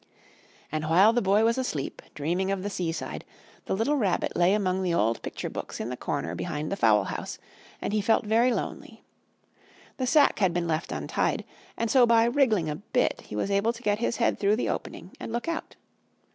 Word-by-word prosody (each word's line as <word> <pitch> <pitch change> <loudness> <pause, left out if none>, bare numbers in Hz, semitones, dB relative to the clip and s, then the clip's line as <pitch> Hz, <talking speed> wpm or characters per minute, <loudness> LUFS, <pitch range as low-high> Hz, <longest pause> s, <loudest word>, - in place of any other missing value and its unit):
And 155 0 -2
while 195 +7 +6
the 240 - +2
Boy 200 +2 +3
was 230 +3 +2
asleep, 155 - -3
dreaming 175 +6 -1
of 195 -1 -1
the 205 - -3
seaside, 170 -3 -3 0.4
the - - -1
little 235 +9 +1
Rabbit 200 -8 0
lay 180 +3 +4
among 190 -2 0
the 180 -2 0
old 115 -5 +1
picture - - -5
books - - -6
in 115 - -3
the 125 - -3
corner 140 +3 -3
behind 155 -3 -4
the - - 0
fowl 110 - +4
house, - - -5 0.4
and - - -3
he 215 - +2
felt 220 +1 +2
very 230 +4 +3
lonely. - - -5 0.9
The 255 - -1
sack 295 +1 +4
had 185 -4 +2
been 175 -1 0
left 160 0 -2
untied, - - -1 0.3
and 230 -1 -1
so 255 -3 +6
by 230 -1 +5
wriggling 235 - +2
a 150 0 -3
bit 245 +7 0
he - - -7
was 150 - -1
able 200 +4 +2
to 240 +1 -12
get 205 -1 +1
his 235 0 -1
head 235 - +1
through 205 +1 +3
the 235 - -1
opening - - -5
and - - -6
look 235 +5 -3
out. 335 -1 -4
200 Hz, 205 wpm, -27 LUFS, 170-230 Hz, 0.9 s, while